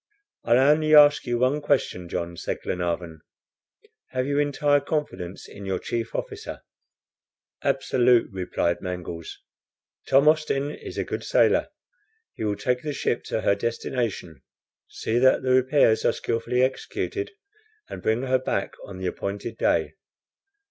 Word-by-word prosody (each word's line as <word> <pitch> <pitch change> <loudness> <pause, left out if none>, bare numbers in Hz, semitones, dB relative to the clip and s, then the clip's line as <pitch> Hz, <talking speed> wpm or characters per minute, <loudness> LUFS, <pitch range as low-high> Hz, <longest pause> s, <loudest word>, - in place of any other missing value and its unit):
"I'll 120 +1 +4
only 155 +3 +4
ask 145 -2 +7
you 120 0 0
one 130 +5 +1
question, 130 -11 0
John," 85 0 -3
said - - -4
Glenarvan. 85 -2 -3 0.9
"Have 130 0 -1
you 140 +1 0
entire 145 0 +2
confidence 135 - -4
in 100 - -11
your 95 -1 -1
chief 115 +4 -4
officer?" - - -5 1.0
"Absolute," 125 -2 +2
replied 90 -2 -1
Mangles, 90 -2 -6 0.7
"Tom 135 +2 +4
Austin 150 -2 +2
is - - -9
a - - 0
good - - -5
sailor. - - +3 0.6
He - - -6
will 105 -1 0
take 125 +4 -1
the 150 -1 -3
ship 135 -3 -1
to 110 - -2
her 100 - +3
destination, 110 - -3 0.5
see 115 +2 -1
that 130 +1 +4
the 130 - +1
repairs 130 -3 +4
are - - +3
skilfully 115 +2 0
executed, 395 - -2 0.5
and - - -8
bring 110 +3 0
her 130 -1 +2
back 130 - -2
on 100 - -9
the 95 - -5
appointed 100 +4 -4
day. - - +1
120 Hz, 140 wpm, -25 LUFS, 95-140 Hz, 1.0 s, ask